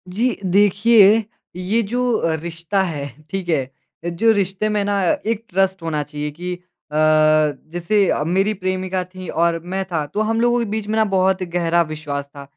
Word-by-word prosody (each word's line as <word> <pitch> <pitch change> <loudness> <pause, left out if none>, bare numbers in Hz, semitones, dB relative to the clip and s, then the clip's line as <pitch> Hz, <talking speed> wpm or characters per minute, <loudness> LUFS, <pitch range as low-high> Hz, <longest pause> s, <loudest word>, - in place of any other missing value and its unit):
जी। 245 +4 +1
देखिए 205 +3 +5 0.3
ये 195 +6 0
जो 245 +4 -1
अ, 165 -4 0
रिश्ता 170 +3 -2
है, 145 -6 -4 0.2
ठीक 190 -2 -4
है? 135 -4 0 0.3
जो 175 +7 +2
रिश्ते 200 +1 0
में 210 -1 0
ना 200 -1 0 0.2
एक 225 0 -1
ट्रस्ट 190 0 +1
होना 155 -2 -1
चाहिए 150 0 -5
कि 180 +4 -5 0.4
अ, 150 - -6 0.8
जैसे 190 +3 +1
अ, - - +1
मेरी 195 +6 +1
प्रेमिका 185 -1 -2
थी 185 0 -10
और 170 0 +1
मैं 195 0 0
था। 160 -5 -2
तो 210 - 0
हम 225 +1 0
लोगों 240 0 +3
के 235 - -1
बीच 215 -1 -3
में 220 - -1
ना 220 - +4
बहुत 190 0 +2
गहरा 170 -1 +1
विश्वास 145 -2 -5
था 140 - -8
185 Hz, 180 wpm, -20 LUFS, 170-210 Hz, 0.8 s, देखिए